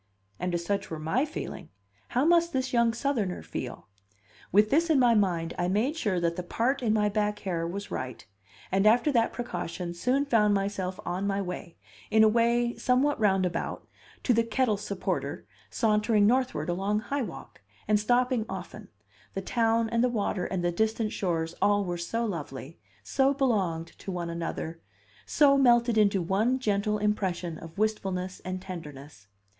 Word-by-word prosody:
And 180 -1 -1
if 170 - -1
such 200 +3 -2
were 160 - -4
my 165 - 0
feeling, 310 - -7 0.4
how 250 +4 +1
must 340 0 +4
this 260 0 -1
young 235 -1 +4
Southerner 225 -6 -2
feel? 90 - -6 0.6
With 210 +3 +4
this 330 +4 +3
in 310 - +4
my 245 -3 +5
mind, 180 -6 +1
I 175 - +1
made 220 - +1
sure 205 - 0
that 170 -1 -1
the - - -1
part 235 +10 -1
in 230 -3 +1
my 210 -1 +2
back 210 0 0
hair 170 -4 -2
was 200 +4 -6
right, 130 -2 -5 0.5
and 195 +2 +3
after 240 +7 +4
that 230 -4 +2
precaution 180 -6 -4
soon 255 +10 +1
found 210 -6 +3
myself 195 -2 -2
on 185 +3 -2
my 200 0 0
way, 180 -2 -6 0.3
in 220 0 +5
a - - +7
way 235 +2 +2
somewhat 260 +2 +2
roundabout, 190 -5 0 0.4
to 250 - +3
the 230 0 +3
kettle 230 -1 +1
supporter 200 0 -3 0.2
sauntering 215 -2 +2
northward 220 - +1
along 195 +4 0
High 280 +4 -2
Walk, 135 - -8 0.3
and 210 0 +3
stopping 245 +1 +1
often; - - -7 0.5
the 195 - -2
town, 230 +1 +1
and 230 +1 +1
the 250 - +3
water, 205 -5 -1
and 180 -2 -2
the 175 - +2
distant 220 +3 0
shores 165 -3 -1
all 205 0 +3
were 175 -1 -3
so 230 +7 -2
lovely, 155 - -6 0.2
so 270 - +2
belonged 190 - 0
to 195 - -6
one 175 -2 -3
another, 165 -1 -4 0.5
so 280 -2 +5
melted 240 -2 +4
into 200 -4 +3
one 215 +9 +1
gentle 210 -3 0
impression 185 -5 -1
of 165 +1 -11
wistfulness 190 -4 -1
and 185 0 -5
tenderness! 150 - -9
210 Hz, 170 wpm, -28 LUFS, 180-235 Hz, 0.6 s, a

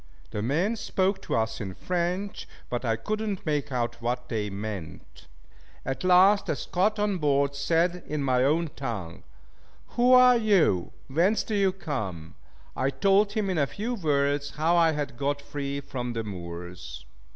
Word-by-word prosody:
The 105 - -3
men 165 - +1
spoke 195 -2 0
to - - -2
us 110 0 -1
in 95 -3 -5
French, 180 +3 -2 0.2
but 120 0 -2
I 115 -2 +1
could 215 - -3
not 205 -3 -3
make 145 -2 -1
out 120 -1 -2
what 125 +1 -2
they 105 -2 -2
meant. 100 -3 -7 0.6
At 135 +5 -3
last 185 +3 +5
a - - +1
Scot 200 +9 0
on 205 -3 0
board 140 -2 +2
said 170 +5 +1
in 150 -2 -2
my 130 -2 +2
own 155 +3 +1
tongue, 105 -11 -5 0.7
"Who 245 +1 +3
are 250 -1 +8
you? 195 - +2 0.2
Whence 180 +10 +2
do 220 - -5
you 200 -2 +3
come?" 105 - -5 0.4
I 130 - +1
told 200 +6 +3
him 215 -2 0
in 185 -4 0
a 140 - +2
few 220 - -4
words 145 -6 0
how 160 +3 +2
I 165 -2 +4
had 145 -5 -4
got 145 +2 -1
free 140 -1 -4
from 125 -3 -5
the 115 -1 -3
Moors. 90 -3 -8
145 Hz, 170 wpm, -27 LUFS, 120-190 Hz, 0.7 s, are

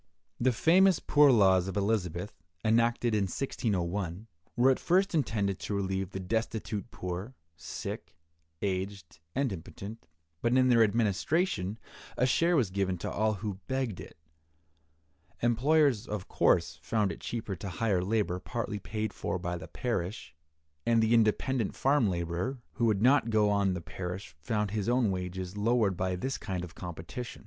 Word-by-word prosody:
The 130 +2 +3
famous 180 - +5
poor 145 -1 +5
laws 95 -6 +5
of 95 - -4
Elizabeth, 100 -2 -1 0.3
enacted 115 +1 +2
in 105 -2 +2
1601, 95 -4 -2 0.3
were 125 +3 +5
at 130 - 0
first 190 +3 +2
intended 100 - 0
to 105 - -3
relieve 95 -1 -1
the 95 - -5
destitute 110 0 -2
poor, 90 +8 -5 0.2
sick, 80 - -6 0.5
aged, 95 -3 -3 0.2
and 135 -5 +1
impotent, 100 +5 -9 0.3
but 120 +2 +2
in 130 0 +4
their 120 -2 +5
administration 110 - +1 0.4
a 125 - +3
share 170 +7 +3
was 120 - +2
given 95 -1 0
to - - -4
all 110 +1 +1
who 100 -1 -5
begged 130 -7 -2
it. - - -10 1.3
Employers, 130 0 +3
of 105 -3 -4
course, 85 -2 +2
found 105 +4 0
it 80 - -8
cheaper 110 -4 -4
to 100 - -6
hire 95 +1 0
labor 100 -3 0
partly 110 0 -4
paid 110 +1 -3
for 95 - -2
by 90 0 -3
the 85 - -7
parish, 95 -7 -3 0.5
and 115 -1 +3
the 110 +1 +3
independent 115 +1 +2
farm 135 -5 +3
laborer 85 +8 -2
who 120 - 0
would 105 -1 +1
not 130 -1 +5
go 105 -2 +3
on 100 -2 +2
the 85 - -4
parish 90 0 -6
found 105 +4 -1
his 105 0 -1
own 120 -4 +3
wages 90 0 -4
lowered 105 -2 +2
by 90 +1 -1
this 130 +9 -3
kind 95 -4 -3
of 85 -2 -8
competition. 90 +8 -7
105 Hz, 155 wpm, -30 LUFS, 95-120 Hz, 1.3 s, famous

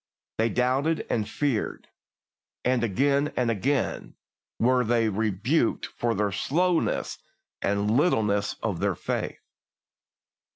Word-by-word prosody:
They 115 +1 +3
doubted 130 +7 +1
and 105 -2 0
feared, 135 -3 -2 0.8
and 125 -1 +2
again 140 +7 +2
and 120 -2 +2
again 130 +5 -1 0.4
were 125 +2 +3
they 115 -1 +2
rebuked 110 - 0
for 120 -1 -2
the 100 0 0
slowness 170 - 0 0.4
and 100 +1 +1
littleness 105 - +2
of - - -1
their - - 0
faith. - - -4
120 Hz, 110 wpm, -26 LUFS, 105-140 Hz, 0.8 s, They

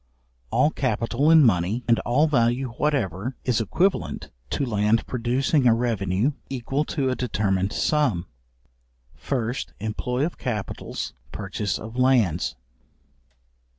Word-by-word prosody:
All 150 - +3
capital 125 +2 0
in 160 -2 +8
money, 105 +1 +2
and 115 -1 +4
all 135 +6 +2
value 125 -2 +1
whatever, 125 - -1
is 120 -3 +2
equivalent 180 - 0 0.2
to 140 - -1
land 105 -1 +1
producing 125 +3 +1
a 115 - +6
revenue 115 0 0 0.2
equal 135 +3 -2
to 135 -4 -1
a - - 0
determined 100 -6 0
sum. 135 - +1 0.9
First, 120 - -3
employ 125 +6 -1
of 170 - -5
capitals, 110 -5 -4 0.2
purchase 100 -1 -3
of 110 +3 -8
lands. 115 - +2
120 Hz, 120 wpm, -24 LUFS, 105-135 Hz, 0.9 s, in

